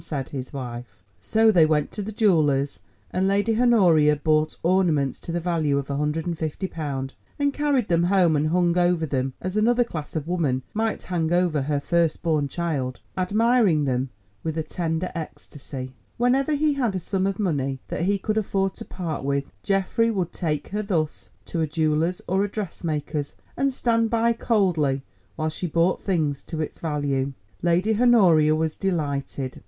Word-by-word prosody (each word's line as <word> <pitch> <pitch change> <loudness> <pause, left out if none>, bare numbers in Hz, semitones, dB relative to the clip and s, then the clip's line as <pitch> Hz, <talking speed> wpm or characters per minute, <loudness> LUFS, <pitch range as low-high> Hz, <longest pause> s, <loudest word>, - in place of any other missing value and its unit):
said 140 -4 -4
his 130 -2 -6
wife. 125 -3 -7 0.2
So 220 0 +3
they 175 -6 +5
went 150 -2 +1
to 210 - -5
the 210 +2 -5
jeweller's, 155 -10 +2 0.3
and 190 +1 +1
Lady 205 +4 +2
Honoria 175 -11 +5
bought 155 +1 +1
ornaments 165 -7 +2
to - - -7
the 175 - -1
value 160 -5 0
of 140 0 -3
£150, 150 -1 -2 0.3
and 285 -1 +1
carried 285 -6 +1
them 170 0 +2
home 180 -4 +3
and 150 +1 +1
hung 175 +1 +2
over 175 -2 +2
them, 135 -3 -1
as 185 +2 -4
another 240 +3 +3
class 155 -11 -7
of 155 -1 -3
woman 150 -8 0
might 220 0 -1
hang 170 -3 -1
over 175 -4 +2
her 145 +1 0
first 165 +2 0
born 155 -4 +1
child, 140 -6 -3 0.2
admiring 200 -3 +3
them 130 0 0 0.3
with 160 0 -3
a 160 - 0
tender 165 +2 -2
ecstasy. 140 -5 -7 0.3
Whenever 265 +5 +2
he 300 +1 +2
had 245 -8 0
a - - 0
sum 190 +2 -1
of 195 -1 -2
money 140 -9 -1
that - - -3
he 200 +1 +2
could 215 +3 0
afford 195 -2 0
to - - -8
part 170 -6 -4
with, 140 0 -1
Geoffrey 195 +4 +1
would 190 -6 -2
take 150 -5 -2
her 210 +2 -2
thus 170 -7 -2 0.2
to 165 - -3
a 160 - +1
jeweller's 155 +3 0
or 190 +2 +2
a 205 - -1
dressmaker's, 160 -7 -4 0.2
and 275 0 +1
stand 230 -3 +1
by 230 +1 +2
coldly 175 - +1 0.3
while 155 - -1
she 165 +3 -4
bought 170 +3 +1
things 155 -7 0
to 160 - -6
its 155 - -4
value. 140 -3 -1 0.3
Lady 180 +6 +2
Honoria 175 -11 +5
was 160 0 -1
delighted. 140 -7 -2
170 Hz, 170 wpm, -24 LUFS, 150-195 Hz, 0.3 s, they